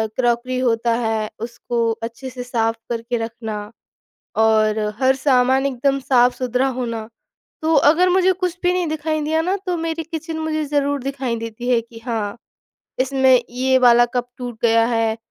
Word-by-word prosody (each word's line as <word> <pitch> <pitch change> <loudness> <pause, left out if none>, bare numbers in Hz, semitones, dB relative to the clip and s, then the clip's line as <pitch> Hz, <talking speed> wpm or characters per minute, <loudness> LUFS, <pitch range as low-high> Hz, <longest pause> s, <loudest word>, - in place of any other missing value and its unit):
Crockery 245 0 0
होता 235 -2 +1
है, 220 -1 -1
उसको 235 0 -2
अच्छे 235 +3 -6
से 250 -1 -7
साफ 225 -2 0
करके 235 +1 -2
रखना, 225 -2 -5 0.7
और 220 -1 +3 0.2
हर 260 0 +4
सामान 260 0 +3
एकदम 275 +1 0
साफ-सुथरा 250 0 +2
होना। 230 -3 -4 0.5
तो 320 +1 +2
अगर 320 +6 +5
मुझे 375 +1 +4
कुछ 360 -1 -3
भी 355 - +3
नहीं 360 -1 0
दिखाई 310 0 -2
दिया 315 +2 +1
ना, 370 +4 0
तो 360 -1 0
मेरी 325 0 -3
किचन 320 0 -5
मुझे 310 -1 -1
ज़रूर 285 -2 0
दिखाई 265 -3 -3
देती 230 +2 -6
है 240 -2 +3
कि 230 0 -13
हाँ, 220 -2 -2 0.6
इसमें 260 -1 +4
ये 260 +2 +2
वाला 240 -1 +6
कप 245 0 0
टूट 245 -2 -6
गया 230 -1 +4
है 225 -2 0
250 Hz, 160 wpm, -20 LUFS, 230-290 Hz, 0.7 s, वाला